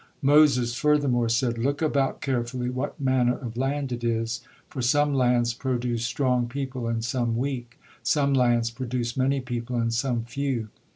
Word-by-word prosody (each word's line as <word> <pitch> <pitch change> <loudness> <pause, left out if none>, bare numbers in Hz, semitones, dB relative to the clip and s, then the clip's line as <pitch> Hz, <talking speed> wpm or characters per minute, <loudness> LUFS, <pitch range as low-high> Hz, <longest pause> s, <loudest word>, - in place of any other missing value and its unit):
Moses 135 -4 +5
furthermore 130 -3 +2
said: 120 0 +1
"Look 140 +4 0
about 140 -4 0
carefully 125 -1 -2
what 130 +5 -4
manner 130 -2 +2
of 120 -4 -7
land 135 +1 -1
it 120 -1 -4
is, 115 0 -1 0.3
for 130 - -5
some 145 +4 +2
lands 120 -2 +2
produce 120 -2 -2
strong 125 0 +1
people 130 -1 -4
and 115 -1 -1
some 120 -1 -1
weak, 120 -2 -4 0.2
some 140 -2 +2
lands 120 -3 +2
produce 120 -1 -3
many 135 +1 +1
people 120 -1 -4
and 115 -1 0
some 120 -1 0
few. 120 -2 -3
125 Hz, 160 wpm, -26 LUFS, 120-135 Hz, 0.3 s, Moses